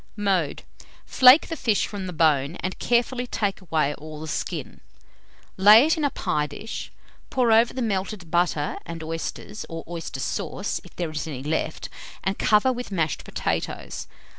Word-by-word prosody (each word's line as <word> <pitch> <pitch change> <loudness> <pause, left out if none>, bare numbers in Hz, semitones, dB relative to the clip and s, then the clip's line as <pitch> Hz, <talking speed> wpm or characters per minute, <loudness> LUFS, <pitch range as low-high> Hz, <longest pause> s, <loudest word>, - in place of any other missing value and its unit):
Mode. 190 -7 0 0.4
Flake 255 +4 +7
the 325 - -3
fish 225 -9 +1
from 200 -3 -6
the - - -4
bone, 155 -2 +2
and 185 - -4
carefully 245 +1 +1
take 205 -5 -2
away 155 -5 0
all 155 +1 -9
the 160 - -7
skin. - - -4 0.8
Lay 210 +6 +8
it 320 - +3
in 315 - -3
a 285 - +3
pie 150 - -1
dish, 220 +9 -7 0.4
pour 245 -3 +2
over 225 +2 +5
the 255 - -3
melted 195 -4 -3
butter 170 -4 +1
and 165 -1 -7
oysters 165 +6 -5
(or 165 -1 -6
oyster 170 -1 -6
sauce, - - -3
if - - -16
there 170 -3 -3
is 155 +1 -4
any 135 -4 -6
left), 155 +1 -2 0.4
and 195 +2 -1
cover 215 +5 +4
with 245 0 -6
mashed 165 -5 -1
potatoes. - - -3
185 Hz, 165 wpm, -25 LUFS, 160-225 Hz, 0.8 s, Lay